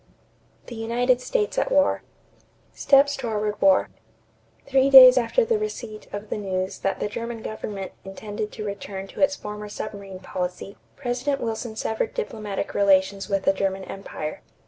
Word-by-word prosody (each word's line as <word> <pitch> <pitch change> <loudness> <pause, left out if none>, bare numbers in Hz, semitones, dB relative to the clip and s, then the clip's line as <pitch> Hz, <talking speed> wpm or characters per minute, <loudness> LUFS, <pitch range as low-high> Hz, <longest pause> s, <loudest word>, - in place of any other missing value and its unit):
THE - - -9
UNITED 245 +3 +1
STATES - - 0
AT - - -1
WAR 285 0 +3 0.7
=Steps 280 0 +4
toward 210 -3 -3
War.= 195 -1 +4 0.8
Three 270 0 +3
days 255 -2 +11
after 255 - +2
the 455 -2 +1
receipt 240 - -6
of 205 +1 -7
the - - -2
news 185 -2 -3
that 195 - -1
the - - -1
German 230 +2 -6
government 205 -3 -5
intended 210 +2 -6
to 215 - -6
return 200 -1 -5
to - - -8
its 285 0 +4
former 210 -3 -7
submarine 200 -2 -7
policy, 180 +2 -5 0.2
President 265 +2 -2
Wilson 225 0 -4
severed 220 - -2
diplomatic 215 - -4
relations 195 0 +2
with 195 -1 0
the 195 - +3
German 195 0 -2
empire. 185 -6 -6
215 Hz, 150 wpm, -24 LUFS, 195-255 Hz, 0.8 s, days